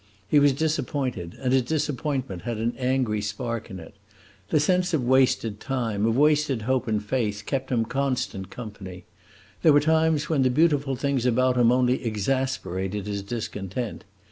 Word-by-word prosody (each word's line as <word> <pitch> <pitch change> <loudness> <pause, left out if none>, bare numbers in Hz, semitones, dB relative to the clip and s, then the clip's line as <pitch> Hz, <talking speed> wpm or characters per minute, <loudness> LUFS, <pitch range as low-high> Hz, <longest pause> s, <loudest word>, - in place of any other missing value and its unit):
He 145 - +4
was 145 0 +5
disappointed, 140 - -2
and 130 -1 0
his 130 - +5
disappointment 135 - -2
had 115 +4 -4
an 115 +2 -1
angry 125 -5 0
spark 115 +2 -4
in 95 - -7
it. 80 +5 -12 0.6
The 155 - +3
sense 180 +3 +2
of 140 - -1
wasted 125 -5 +2
time, 115 -6 -1
of 115 +1 +1
wasted 150 -5 +2
hope 130 +2 0
and 105 -1 -1
faith, 105 -3 -1
kept 135 -1 -3
him 115 -2 +1
constant 125 -6 -2
company. 95 -6 -9 0.6
There 155 - +6
were 145 - +6
times 160 0 +2
when 155 -4 +1
the 130 - +3
beautiful 145 -1 +2
things 135 -1 0
about 130 +1 +2
him 120 -1 +4
only 125 +1 +2
exasperated 105 -4 -2
his 100 -1 -3
discontent. 105 +1 -5
125 Hz, 165 wpm, -25 LUFS, 105-140 Hz, 0.6 s, There